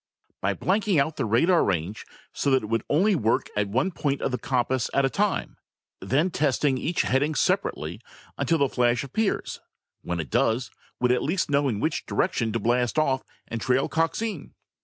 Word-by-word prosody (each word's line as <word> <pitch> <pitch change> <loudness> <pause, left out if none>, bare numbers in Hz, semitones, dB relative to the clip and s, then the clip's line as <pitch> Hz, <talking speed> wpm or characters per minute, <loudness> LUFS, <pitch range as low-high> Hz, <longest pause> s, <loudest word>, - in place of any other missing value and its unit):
"By - - 0
blanking 195 -3 +1
out 145 +3 0
the - - -1
radar 165 - +4
range, 95 +2 -2 0.3
so - - 0
that 130 -3 +3
it 105 - -6
would 115 0 0
only 190 +8 +3
work 115 -7 0
at 105 -1 +1
one 130 - +1
point 140 -4 -1
of - - 0
the 125 - -2
compass 130 -1 0
at 140 - +3
one 135 - +1
time, 205 -1 -1 0.4
then 140 - +1
testing 140 -3 +1
each 170 +6 0
heading 145 +4 +1
separately - - -1 0.3
until 165 - +1
the 140 -2 +3
flash 120 -1 +1
appears. 195 - -2 0.4
When 85 0 -3
it 75 -6 -5
does, 115 +3 +1 0.3
we'd 125 0 +2
at 125 - +2
least 170 -1 -1
know 140 0 +3
in 110 -6 -1
which 155 +7 -2
direction 115 -2 0
to 115 - 0
blast 120 +4 +1
off 135 -4 +2 0.3
and 115 -1 -5
trail 130 +3 +2
Coxine. 165 +3 -2
135 Hz, 185 wpm, -25 LUFS, 115-160 Hz, 0.4 s, radar